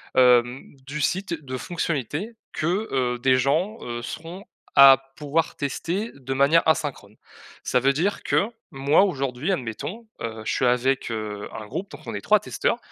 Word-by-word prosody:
hem, 125 0 +4
du 150 +2 -4
site, 190 +3 0
de 130 -1 -5
fonctionnalités 165 - -3 0.2
que, 180 +8 -1
heu, 125 -2 0
des 130 +1 +4
gens, 160 - +1
heu, 120 0 -5
seront 165 - -7 0.3
à 135 -1 +10 0.2
pouvoir 150 +2 -1
tester 175 - -3
de 135 -1 -5
manière 140 +5 +4
asynchrone. 140 -10 -1 0.5
Ça 125 - +2
veut 135 +2 +3
dire 180 +8 -1
que, 200 - +2 0.2
moi, 140 +6 +3
aujourd'hui 140 -3 -1
admettons, 175 - -4
heu, 110 -1 -5
je - - -1
suis - - +1
avec, 125 +1 +1
heu, 105 -2 -4
un 110 - -7
groupe, 195 - -5
donc - - -10
on - - -4
est - - -4
3 - - +4
testeurs. - - -1
140 Hz, 165 wpm, -24 LUFS, 125-170 Hz, 0.5 s, à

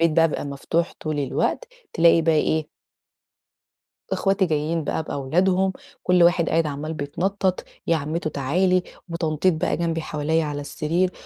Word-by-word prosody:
الباب 165 0 +4
بيبقى - - -3
مفتوح 145 +4 -1
طُول 155 -1 -3
الوقت، 140 - -1 0.2
تلاقي 165 0 +5
بقى 160 0 +3
إيه 155 0 +1 1.4
أخواتي 195 -1 +2
جايين 155 0 -1
بقى 160 - -1
بأولادهم 180 +7 +1 0.3
كُل 180 -1 +4
واحد 170 -1 +4
قاعد 165 0 +2
عمّال 150 +2 -4
بيتنطط 180 +6 -1 0.2
"يا 165 - +3
عمتو 155 +2 -2
تعالي" 180 +7 +1 0.3
وتنطيط 170 +1 +1
بقى 155 - 0
جنبي 165 0 -1
حواليا 155 +1 0
على 145 -1 -3
السرير 165 +5 -1
165 Hz, 140 wpm, -23 LUFS, 150-175 Hz, 1.4 s, تلاقي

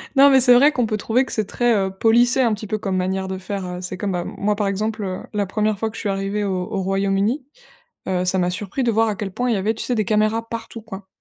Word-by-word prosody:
Non, 275 +1 +8
mais 265 - +6
c'est 245 -1 +6
vrai 285 +4 +6
qu'on 245 -6 0
peut 215 -1 -1
trouver 235 +5 +1
que - - -10
c'est 215 - -1
très, 240 +3 +1
heu, 195 -2 0
policé 235 +6 +3
un 230 -3 +3
petit 215 +1 -5
peu 215 0 -2
comme 190 -2 -2
manière 190 +1 -1
de 190 0 -4
faire, 190 0 -5
heu, 180 0 -6
c'est 180 0 -5
comme, 200 -1 -2
ben, 175 -1 -1
moi, 210 +1 -1
par 205 -1 -1
exemple, 210 +2 -2
heu, 185 -1 -3
la 205 -1 0
1re 215 +2 0
fois 220 +2 -1
que - - -14
je - - -6
suis 205 - -2
arrivé 195 +1 -2
au 185 -2 -1
au 195 -3 -1
Royaume-Uni, 195 +7 0 0.6
heu, 180 -1 0
ça 185 +1 +1
m'a 180 0 +1
surpris 200 +7 -3
de 235 - +2
voir 225 +1 +2
à 215 - -1
quel 195 -1 -5
point 245 +5 -1
il - - +2
y - - 0
avait, 210 +4 0
tu - - -5
sais, 250 - 0
des 215 -3 0
caméras 215 +2 +1
partout, 230 0 -6
quoi 200 -3 -10
210 Hz, 295 wpm, -21 LUFS, 190-225 Hz, 0.6 s, Non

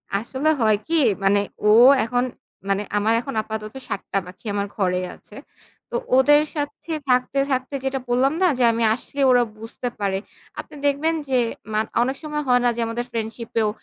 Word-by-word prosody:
আসলে 260 +8 -1
হয় 215 -2 +4
কি 330 - +1 0.3
মানে 200 +1 +4 0.3
ও - - +6 0.3
এখন, 245 +2 0 0.5
মানে 195 +1 +1 0.2
আমার 215 +2 +2
এখন 275 +2 -6
আপাতত 215 0 -6 0.2
৭ 195 - -3
টা 195 - +3
পাখি 180 +5 -14
আমার 200 0 -1
ঘরে 180 -3 0 0.2
আছে। - - -18 0.5
তো 485 - -6 0.2
ওদের 295 +3 +6
সাথে 290 +2 -5 0.2
থাকতে, 250 +2 +2
থাকতে 260 +2 -1
যেটা 265 0 -1
বললাম 260 +4 +2
না 370 - +5
যে 255 - +2
আমি 230 0 -1
আসলে 275 +3 -6
ওরা 245 -1 +5
বুঝতে 225 +3 -6
পারে। 195 -2 0 0.4
আপনি - - -8
দেখবেন 285 +3 +2 0.2
যে 260 - +2 0.4
মান 215 +1 +1 0.2
অনেক 260 +3 0
সময় 300 -1 -3
হয় 245 -1 +4
না - - +5
যে 235 - -2
আমাদের 235 +2 -3
ফ্রেন্ডশিপ 230 0 -5
এও 215 - +2
245 Hz, 180 wpm, -22 LUFS, 215-270 Hz, 0.5 s, ও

